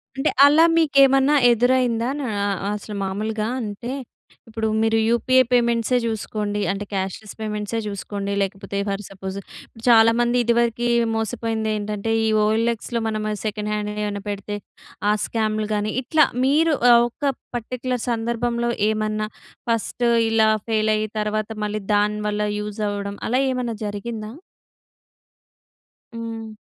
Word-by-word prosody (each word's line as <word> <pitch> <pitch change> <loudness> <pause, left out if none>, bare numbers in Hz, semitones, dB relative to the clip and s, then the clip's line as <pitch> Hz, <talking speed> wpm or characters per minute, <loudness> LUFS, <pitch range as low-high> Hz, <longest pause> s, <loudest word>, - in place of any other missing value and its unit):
అంటే, 270 +3 +1 0.2
అలా 310 +3 +6
మీకేమన్నా 275 -2 +5 0.2
ఎదురైందా? 245 0 +2
నా 265 - -3 0.5
అసలు 210 0 -7
మామూలుగా, 215 +3 -2
అంటే 220 +3 -5 0.6
ఇప్పుడు 225 0 -2
మీరు 225 0 +2
యూపీఏ 255 +3 +4
పేమెంట్సే 235 0 +2
చూసుకోండి, 210 -2 -2
అంటే 200 +1 -4
క్యా‌ష్‌లె‌స్ 195 +2 -4
పేమెంట్సే 210 +1 -3
చూసుకోండి, 200 0 -4
లేకపోతే 195 0 -3
ఫర్ 200 +1 -3
సపోజ్ 190 0 -6
ఇప్పుడు 225 +3 -16
చాలామంది 235 +1 +5
ఇదివరకి 235 0 +1 0.3
మోసపోయింది 225 0 -2
ఏంటంటే 210 +1 -3
ఈ - - +2 0.2
ఓఎల్ఎక్స్‌లో 230 +2 0
మనం 215 -1 -2 0.2
సెకండ్ 210 0 -2
హ్యాండ్ 210 0 -2
ఏమన్నా 205 -1 -3
పెడితే 205 +1 -4 0.5
ఆ - - +5
స్క్యామ్‍లు 215 -1 -1
కానీ 210 0 -1
ఇట్లా 305 +3 +4 0.2
మీరు 310 +4 +3 0.3
ఒక 275 +3 -2 0.2
పర్టిక్యులర్ 250 +1 -3
సందర్భంలో 235 +1 -1 0.2
ఏమన్నా 215 0 -1 0.4
ఫస్ట్ 230 +2 -1 0.2
ఇలా 220 -1 +4 0.2
ఫెయిల్ 215 -1 +1
అయి 215 0 -1
తర్వాత 215 0 -1 0.2
మళ్ళీ 210 0 -3
దాని 210 +1 +2
వల్ల 210 0 -1 0.2
యూజ్ 210 +1 -5
అవ్వడం 200 0 -4
అలా 250 +3 +2
ఏమన్నా 245 -3 -2
జరిగిందా? 215 +1 -5 1.8
హ్మ్. 225 -1 -6
220 Hz, 125 wpm, -22 LUFS, 210-235 Hz, 1.8 s, అలా